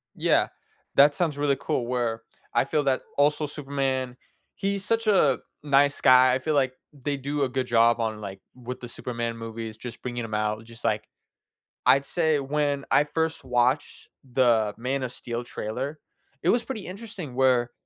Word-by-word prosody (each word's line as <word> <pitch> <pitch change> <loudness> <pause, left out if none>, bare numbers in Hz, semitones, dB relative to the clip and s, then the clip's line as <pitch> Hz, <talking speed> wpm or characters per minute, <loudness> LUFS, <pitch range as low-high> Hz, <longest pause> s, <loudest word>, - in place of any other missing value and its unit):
Yeah, - - +3 0.5
that 145 +1 +6
sounds 160 -5 0
really 145 -1 +1
cool 120 - -1
where 120 -2 -1 0.3
I - - +4
feel 150 - 0
that 135 -1 +2 0.2
also 150 +1 +3
Superman, 135 -3 -2 0.4
he's 195 0 -2
such 230 0 0
a 150 -10 +4 0.2
nice 140 0 +3
guy. 130 0 +7
I 130 - +1
feel 155 +4 -1
like 130 -3 +2 0.2
they 145 0 -3
do 140 +2 -2
a 135 - +1
good 130 0 -2
job 115 0 +4
on, 110 -2 -2
like 95 -1 -7 0.2
with 125 0 -7
the 120 - -7
Superman 115 -1 -4
movies, 115 -1 -6
just 120 0 -8
bringing 120 -1 -4
him 110 -1 -7
out. 105 +1 -1
Just 115 0 -14
like, - - 0 0.8
I'd 135 +3 +5
say 160 -1 +1
when 140 0 -1
I 145 - +5
first 160 +1 -2
watched 125 +2 0 0.2
the 120 -4 +3
Man 130 +3 -2
of 125 -1 -4
Steel 120 0 -5
trailer, 130 +6 -5 0.4
it 170 - +2
was 235 +3 +3
pretty 220 -7 -5
interesting 185 - -7
where 125 -2 +3
130 Hz, 175 wpm, -26 LUFS, 120-145 Hz, 0.8 s, guy